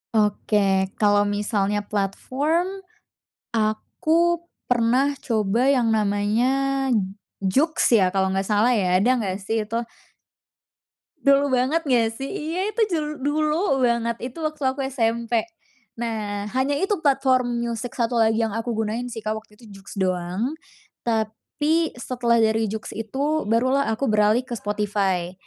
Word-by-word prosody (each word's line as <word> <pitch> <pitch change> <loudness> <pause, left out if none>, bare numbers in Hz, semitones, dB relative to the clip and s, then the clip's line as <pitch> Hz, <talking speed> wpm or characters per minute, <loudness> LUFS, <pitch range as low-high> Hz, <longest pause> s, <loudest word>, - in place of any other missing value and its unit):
Oke, 205 -2 +2
kalo 205 -1 +3
misalnya 205 0 0
platform 285 - -1 0.7
aku 315 +10 +1 0.3
pernah 250 +4 +3
coba 225 +1 +1
yang 250 -5 +3
namanya 235 +7 +1 0.6
JOOX 275 - +2
ya 185 - +4
kalo 190 0 0
nggak 195 0 -1
salah 215 +3 +3
ya, 185 -6 +2
ada 245 +5 +4
nggak 195 -4 -2
sih 220 +1 -1
itu? 230 - -4 1.5
Dulu 280 +1 +5
banget 260 +6 +2
nggak 245 -7 +2
sih? 270 +4 -6
Iya 345 +6 -2
itu 430 +2 -2
jul 310 -2 0
dulu 300 +1 +1
banget, 235 -1 +1
itu 250 +3 -6
waktu 305 -1 -4
aku 265 +2 -5
SMP. 235 -3 0 0.6
Nah, 215 -3 -3
hanya 270 +2 +1
itu 390 -1 0
platform 260 -4 +2
musik 235 0 -4
satu 235 -1 +1
lagi 220 0 +3
yang 220 - -4
aku 230 +2 -3
gunain 225 +2 -2
sih 225 -2 -8
Kak 215 - 0
waktu 215 -1 -10
itu 235 - -16 0.2
JOOX 195 - -11
doang. 185 - -1 0.5
Tapi 245 +9 0
setelah 240 -1 0
dari 220 -1 +2
JOOX 220 +1 -6
itu 275 +7 -2
baru 240 +4 +2
lah - - -1
aku 275 +5 -2
beralih 215 +3 +3
ke 250 - -7
Spotify, 200 -4 -1
230 Hz, 140 wpm, -23 LUFS, 210-270 Hz, 1.5 s, Dulu